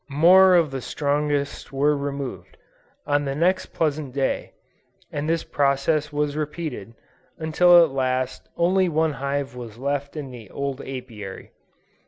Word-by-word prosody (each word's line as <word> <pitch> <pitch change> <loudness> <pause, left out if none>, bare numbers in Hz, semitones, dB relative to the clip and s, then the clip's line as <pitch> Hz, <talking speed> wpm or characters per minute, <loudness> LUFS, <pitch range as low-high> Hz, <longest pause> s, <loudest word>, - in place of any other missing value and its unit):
More 180 +6 +6
of 165 -5 +3
the 135 -1 -4
strongest 145 0 -1
were 145 +2 +2
removed, 140 -10 -5 0.5
on 145 0 +1
the 135 0 -2
next 180 +5 +1
pleasant 150 -4 -2
day: 135 -1 -1 0.6
and 145 +2 -3
this 165 0 +1
process 145 +2 +1
was 145 0 -1
repeated, 150 - -5 0.4
until 175 +2 +6
at 160 - 0
last 130 -1 -2
only 185 +2 +3
one 160 -1 +1
hive 140 -2 -3
was 115 -3 -8
left 140 +3 -3
in 140 -3 -6
the 115 -5 -11
old 140 -1 -4
Apiary. 115 -7 -8
145 Hz, 140 wpm, -23 LUFS, 135-155 Hz, 0.6 s, More